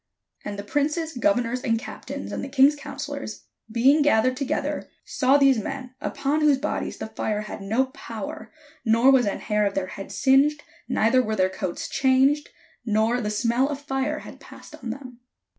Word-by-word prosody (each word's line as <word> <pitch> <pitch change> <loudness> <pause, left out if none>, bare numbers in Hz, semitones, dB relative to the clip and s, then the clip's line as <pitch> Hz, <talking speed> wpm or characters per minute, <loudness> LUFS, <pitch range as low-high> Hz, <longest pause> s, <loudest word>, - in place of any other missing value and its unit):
And 205 -1 -5
the 200 - -5
princes, 305 +8 -1
governors, 250 -3 +1
and 230 -2 +1
captains, 280 +3 -7
and - - -4
the 275 - -5
king's 275 +2 +5
counsellors, 285 -4 -6 0.3
being 265 +7 +4
gathered 255 -3 +3
together, 270 0 -2 0.2
saw 270 +1 +3
these 275 -4 +4
men, 255 +3 -6
upon 295 +1 -1
whose 295 -3 +5
bodies 285 +3 -3
the - - -5
fire 215 -1 -2
had 210 -1 -7
no 225 +7 +1
power, 225 -4 -8 0.3
nor 230 +3 +5
was 255 -5 +4
an 200 - -2
hair 210 -1 +1
of 200 -1 0
their 195 - 0
head 195 - -8
singed, 280 +3 +3 0.3
neither 230 +4 +3
were 220 -3 -2
their 185 -2 +2
coats 185 -2 -4
changed, 270 +2 +2 0.3
nor 225 +2 +1
the 210 - -2
smell 235 +5 +1
of 285 -2 -4
fire 285 +1 -2
had - - -11
passed - - -14
on 245 - -7
them. 250 0 -8
260 Hz, 175 wpm, -24 LUFS, 220-280 Hz, 0.3 s, king's